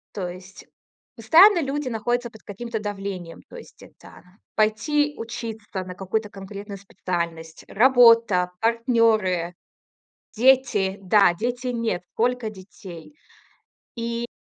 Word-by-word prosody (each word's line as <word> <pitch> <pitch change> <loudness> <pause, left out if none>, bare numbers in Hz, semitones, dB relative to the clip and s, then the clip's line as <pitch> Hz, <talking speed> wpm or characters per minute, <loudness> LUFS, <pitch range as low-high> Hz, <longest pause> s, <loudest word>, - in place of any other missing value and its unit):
то 190 -3 -3
есть 185 +2 -11 0.5
постоянно 335 - +6
люди 275 -1 -3
находятся 240 +1 -2
под 220 -1 -17
каким-то 225 +3 -6
давлением: 195 -4 -6
то - - -13
есть 470 - -14
это - - -16 0.3
пойти 290 +8 +1
учиться 225 -4 -6
на 180 0 -9
какую-то 210 +3 -3
конкретную 200 +1 -9
специальность, 170 -4 -5
работа, 230 -6 +5
партнеры, 225 -7 +1 0.8
дети. 230 -6 +3
Да- 195 -1 +4
дети, 245 +2 -3
нет, 230 -7 -2
сколько 245 -1 -1
детей. 185 - -12 0.8
И 235 0 -3
220 Hz, 110 wpm, -23 LUFS, 190-240 Hz, 0.8 s, постоянно